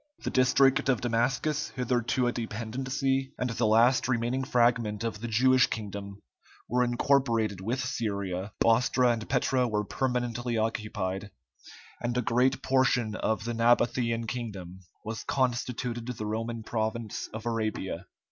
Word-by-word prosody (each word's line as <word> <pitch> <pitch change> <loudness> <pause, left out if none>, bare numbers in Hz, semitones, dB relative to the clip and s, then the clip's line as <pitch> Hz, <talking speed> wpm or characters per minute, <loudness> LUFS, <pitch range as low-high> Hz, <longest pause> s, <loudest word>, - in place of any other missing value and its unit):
The - - -2
district 135 +2 +4
of 125 -4 +3
Damascus, 125 +6 0
hitherto 125 0 0
a 120 - +2
dependency, 130 +4 -2
and 125 -1 -1
the 115 -1 +1
last 115 +4 +4
remaining 125 +1 0
fragment 115 -4 +1
of 110 -2 -3
the 120 - -3
Jewish 130 +3 +4
kingdom, 100 -2 -6 0.5
were 125 +2 +2
incorporated 120 -5 +1
with 125 +6 -2
Syria; 100 -5 -3
Bostra 125 +2 +4
and 110 -2 -6
Petra 125 -1 +2
were 105 -2 0
permanently 120 -1 -1
occupied, 105 -3 -2 0.7
and 120 0 -1
a 125 - +1
great 125 +4 +2
portion 130 -4 +2
of 110 0 -1
the 120 - -2
Nabathæan 115 0 +2
kingdom 100 -7 -6 0.3
was 110 +1 -4
constituted 125 -2 -1
the 115 -4 -4
Roman 115 +1 -3
province 110 0 -3
of 110 +1 -7
Arabia. 110 -6 -2
120 Hz, 135 wpm, -28 LUFS, 110-125 Hz, 0.7 s, district